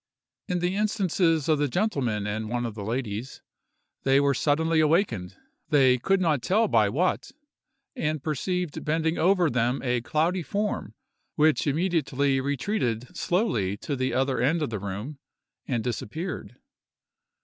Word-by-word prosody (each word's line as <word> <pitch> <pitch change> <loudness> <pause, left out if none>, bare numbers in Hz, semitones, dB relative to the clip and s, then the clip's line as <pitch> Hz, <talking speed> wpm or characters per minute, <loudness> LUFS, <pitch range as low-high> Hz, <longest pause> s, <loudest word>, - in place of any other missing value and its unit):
In 180 -1 -1
the 180 +2 0
instances 185 -7 +1
of 155 -2 +3
the 145 - +2
gentlemen 130 - -1
and 110 +1 -3
one 120 +1 -1
of 115 - -4
the 105 -1 -7
ladies, 115 +1 -4 0.6
they 135 +1 +4
were 140 0 +3
suddenly 160 +4 +1
awakened, 155 - +1 0.3
they 130 -4 +4
could 195 +9 +2
not 155 -7 +1
tell 215 - +2
by 110 - +3
what, 175 - 0 0.7
and 155 - -2
perceived 175 +2 -2
bending 160 +2 0
over 180 0 +4
them 125 -1 0
a 125 -2 0
cloudy 165 +9 0
form, 205 +5 -3 0.4
which 155 0 +3
immediately 140 -4 +1
retreated 130 - -2
slowly 145 - 0
to 145 - -4
the 130 0 -1
other 130 -1 0
end 155 +5 +2
of 140 - -3
the 110 - -3
room, 100 +9 -6 0.5
and 120 -4 -1
disappeared. 125 - -4
145 Hz, 145 wpm, -26 LUFS, 120-170 Hz, 0.7 s, they